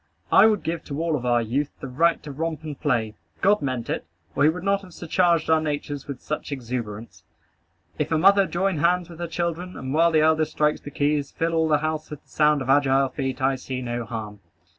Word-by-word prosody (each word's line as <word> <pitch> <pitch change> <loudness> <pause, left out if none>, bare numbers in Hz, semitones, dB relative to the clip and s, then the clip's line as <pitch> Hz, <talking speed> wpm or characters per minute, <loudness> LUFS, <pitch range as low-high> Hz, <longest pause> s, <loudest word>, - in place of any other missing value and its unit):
I - - +8
would 215 -3 +1
give 165 0 -3
to 145 0 -5
all 165 -1 0
of 125 -3 -3
our 120 -1 +3
youth 135 +6 -1
the 135 - -6
right 165 +6 +1
to 150 - -7
romp 160 +2 -4
and 150 -3 -7
play. 115 -7 0 0.3
God 205 +2 +4
meant 130 -4 -3
it, - - -2 0.3
or - - -1
he 150 - +6
would 170 +2 -4
not 200 0 +1
have 185 -3 -14
surcharged 170 -1 +1
our 160 -1 +4
natures 145 -2 -4
with 140 -3 -7
such 150 0 -4
exuberance. 115 - -5 0.8
If - - -1
a 160 - +3
mother 195 +3 +5
join 190 0 0
hands 175 +2 +1
with 170 - -12
her 170 - -3
children, 170 +2 -3
and 130 +1 -5
while 165 +2 +4
the 155 -1 +4
eldest 155 0 +2
strikes 150 0 +1
the - - -8
keys, 145 0 0
fill 165 0 -2
all 160 -1 +2
the 150 -1 +4
house 155 +1 -3
with 150 - -9
the - - -33
sound 150 -2 +2
of 130 - -7
agile 135 -1 +3
feet, 135 -1 -4
I 135 0 +3
see 130 0 -5
no 120 0 -3
harm. 110 -2 -6
150 Hz, 230 wpm, -24 LUFS, 135-165 Hz, 0.8 s, I